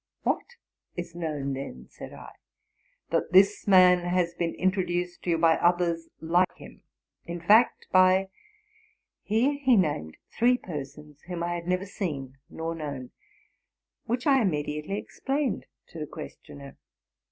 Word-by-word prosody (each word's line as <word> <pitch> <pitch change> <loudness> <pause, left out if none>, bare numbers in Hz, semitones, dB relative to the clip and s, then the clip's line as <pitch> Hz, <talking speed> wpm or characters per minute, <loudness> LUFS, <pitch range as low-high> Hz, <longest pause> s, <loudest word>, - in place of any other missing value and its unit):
'' - - -65
—'* - - -60
Whatis 175 - -5
known, 150 -5 -3
then?'' 65 - -7
said - - -10
IT. - - -11 0.4
'* - - -43
That - - 0
this 200 +3 +5
man 185 -2 +7
has 175 -1 0
been 170 -1 -2
introduced 180 -2 -1
to - - -4
you 165 - +3
by 165 0 +4
others 170 -1 +1
like 175 +3 +2
him - - -14 0.2
— - - -52
in 175 - -4
fact, 215 +8 +4
by... 185 +1 +5 0.5
.'' 440 - -37
Here 265 +6 +2
he 260 -4 +5
named 145 - 0 0.2
three 245 +2 +4
persons 150 - -8
whom 175 -2 -4
I 175 0 -1
had 170 0 -5
never 180 +1 0
seen 140 -9 -5
nor 165 +1 -4
known, 140 -6 -6 0.9
which 245 +2 -2
I 270 -2 +5
immediately 150 0 -2
ex - - -10
plained 275 -1 -1 0.2
to 165 - -9
the 150 - -4
questioner. 140 -2 -10
175 Hz, 155 wpm, -27 LUFS, 150-190 Hz, 0.9 s, man